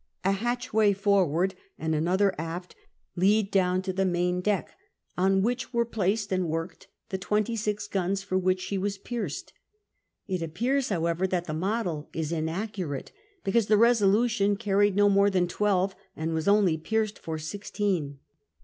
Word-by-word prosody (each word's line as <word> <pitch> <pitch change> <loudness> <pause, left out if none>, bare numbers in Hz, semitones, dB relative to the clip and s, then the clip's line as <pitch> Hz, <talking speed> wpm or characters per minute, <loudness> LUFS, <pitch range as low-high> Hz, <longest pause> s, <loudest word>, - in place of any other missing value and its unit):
A 195 - +4
hatchway 220 -1 +1
forward 190 -3 +2 0.2
and 160 0 -1
another 185 +5 +2
aft 170 +3 -5 0.4
lead 200 +3 +3
down 185 -1 +2
to 190 -1 -2
the 195 +1 +1
main 180 0 0
deck, 205 0 -1 0.4
on 190 +1 +2
which 245 +3 -2
were 235 0 +3
placed 205 -2 -1
and 185 -3 0
worked 165 +2 -4 0.2
the 190 - -3
twenty 210 +4 0
six 210 -1 -2
guns 195 0 -1
for 195 -1 -3
which 185 0 +2
she 195 +1 -2
was 200 +1 -2
pierced. 205 - -5 0.7
It 185 -3 -2
appears, 245 - 0
hoAvever, 170 0 0
that 180 -2 -1
the 155 - -4
model 180 -3 -2
is 160 -1 -3
inaccurate, 170 -2 -3 0.3
because 210 +2 +2
the 215 - +5
Besolution 215 -2 +3
carried 205 -2 +2
no 205 0 +5
more 200 0 +4
tlum 185 -2 +1
twelve, 195 0 +1 0.2
and 160 +1 -2
was 160 +2 -2
only 200 -6 +4
pierced 215 +4 -1
for 160 -1 -4
sixteen. 175 -3 -2
195 Hz, 160 wpm, -27 LUFS, 175-210 Hz, 0.7 s, the